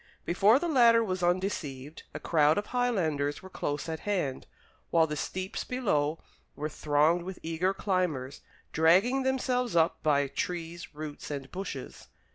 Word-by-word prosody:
Before 200 +7 +4
the 345 - -2
latter 235 -6 +5
was 185 -4 -2
undeceived, 165 -6 -2
a - - -6
crowd 155 -2 +3
of 205 - -1
Highlanders 175 - 0
were 190 - -11
close 145 -2 -3
at 160 -1 -4
hand, 180 -10 -2 0.4
while 165 -1 +4
the 150 -1 -4
steeps 185 +5 -4
below 165 - 0 0.4
were 150 +1 -3
thronged 150 +3 +2
with 185 +1 -7
eager 165 +3 0
climbers, 180 -9 -2 0.3
dragging 190 - +4
themselves 250 -3 0
up 165 -1 +2
by 145 -2 +3
trees, 165 +3 -5
roots, 150 -1 -7
and 140 -2 -5
bushes. 180 -8 -7
170 Hz, 145 wpm, -29 LUFS, 150-200 Hz, 0.4 s, latter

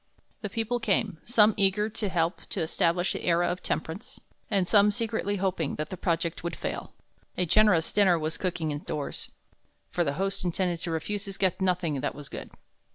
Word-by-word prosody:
The 210 - -3
people 230 +3 -1
came, 195 -7 0
some 220 -2 +5
eager 200 +1 +3
to 220 -2 -3
help 170 0 0
to - - -2
establish 170 +2 +1
the - - -5
era 175 0 +3
of 180 - -2
temperance, 160 +7 -4 0.3
and 195 -4 +2
some 205 0 +6
secretly 210 -1 -1
hoping 185 -6 -1
that 155 0 -4
the - - -3
project 170 -2 -1
would 170 - -3
fail. - - -5 0.4
A 180 - +2
generous 185 -2 +4
dinner 195 -4 +4
was 155 0 -2
cooking 170 -2 -2
indoors; 145 0 -3 0.6
for 175 - +1
the 140 -3 0
host 195 +5 -2
intended 175 -1 0
to 175 - -4
refuse 195 +5 -2
his 195 -1 -7
guests 185 -1 +1
nothing 175 -7 +1
that - - -2
was 145 -1 -9
good. - - -7
180 Hz, 185 wpm, -28 LUFS, 165-205 Hz, 0.6 s, some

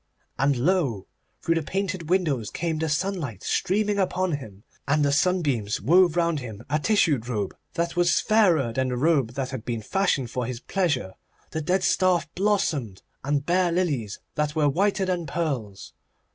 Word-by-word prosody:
And 140 +1 +3
lo! 135 - +1 0.4
through 165 - +2
the 165 - 0
painted 185 0 -3
windows 155 - +1
came 165 -2 -2
the 160 0 -1
sunlight 150 - -2
streaming 205 +2 0
upon 185 -1 0
him, 110 -9 -6 0.2
and 145 +1 +2
the 140 - +2
sun 180 +5 +2
beams 115 -8 -1
wove 175 - +4
round 170 -3 +1
him 115 -4 -8
a 150 - +2
tissued 150 - +2
robe 105 -5 -2 0.2
that 170 0 -1
was 175 -1 +3
fairer 175 - +3
than 130 +2 0
the 125 -1 -2
robe 135 -4 +2
that 130 0 -3
had 130 -5 -5
been 115 -2 -4
fashioned 140 - 0
for 125 -2 -2
his 125 -2 -5
pleasure. 140 - -1 0.4
The 160 - -2
dead 185 +5 +1
staff 185 -3 +2
blossomed, 160 - 0 0.2
and 145 +1 0
bare 180 +1 +2
lilies 145 - -1 0.2
that 150 0 -1
were 155 -2 +3
whiter 195 +6 +1
than 180 -3 -2
pearls. 130 - -3
155 Hz, 170 wpm, -25 LUFS, 125-180 Hz, 0.4 s, wove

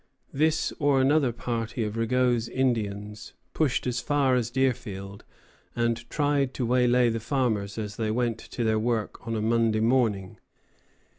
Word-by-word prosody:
] - - -38
This 160 0 +1
or 145 -3 +3
another 135 -1 +3
party 115 0 -3
of 105 0 -3
Rigaud's 120 0 +1
Indians 110 -4 -2 0.2
pushed 150 -5 0
as 125 -1 -1
far 135 +1 +1
as 120 -2 +1
Deerfield 110 -7 -2 0.5
and 115 0 -1
tried 145 -3 0
to 125 - -1
waylay 125 0 +3
the 115 0 -2
farmers 110 -5 -1
as 105 -2 -5
they 110 -1 -1
went 115 0 0
to 120 - -5
their 110 -1 +2
work 115 0 -2
on 115 - -2
a 110 - -1
Monday 115 -1 +2
morning. 110 -5 +1
120 Hz, 155 wpm, -26 LUFS, 110-130 Hz, 0.5 s, or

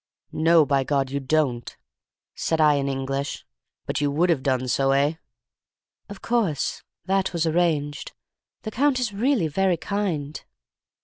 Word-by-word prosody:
"'No, 165 0 +4
by 140 -1 +1
God 135 -1 0
you 140 - -1
don't!' 135 -4 -1 0.6
said 160 - -1
I 150 -1 +5
in 140 -1 0
English. 135 +1 -3 0.4
'But - - -2
you 145 - +2
would 170 +5 +2
have 150 -6 +1
done 130 -1 0
so, 135 +2 +2
eh?' 145 +4 +1 0.9
"'Of 200 -1 -10
course. 210 - 0 0.2
That 190 0 0
was 170 -1 0
arranged. 155 -3 0 0.5
The 215 - -5
Count 275 +1 +2
is 240 -5 -2
really 230 - +1
very 185 +3 +1
kind. 165 -6 -3
155 Hz, 145 wpm, -24 LUFS, 140-190 Hz, 0.9 s, I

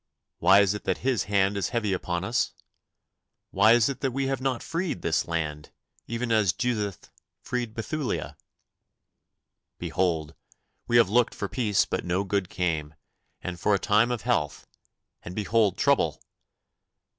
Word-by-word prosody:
Why 100 +1 +6
is 100 -1 +2
it 105 - -7
that - - -2
His 130 -4 +1
hand 100 0 +2
is 100 -2 -1
heavy 110 -5 0
upon 90 -1 -2
us? 115 +6 0 1.0
Why 110 - +5
is 120 -2 +4
it 140 - -3
that 135 - 0
we 135 +2 -2
have 135 -1 -1
not 130 -3 -1
freed 165 - -3
this 80 -1 +1
land, 75 -3 -3 0.4
even 115 +1 -3
as 105 -5 +3
Judith 105 -5 -3 0.3
freed 120 -3 -3
Bethulia? 140 +4 -3 1.4
Behold, 80 -4 -1 0.5
we 120 0 +4
have 115 -5 +5
looked 120 +1 +3
for 100 - -3
peace 105 -4 +1
but - - -3
no 90 +2 0
good 100 -1 -1
came, 80 -4 -2 0.5
and 90 -1 -5
for 105 - +3
a - - +2
time 105 +4 +3
of 120 -4 -3
health, 90 - -1 0.6
and 90 - -8
behold 105 -1 +2
trouble! - - +2
105 Hz, 155 wpm, -26 LUFS, 90-120 Hz, 1.4 s, Why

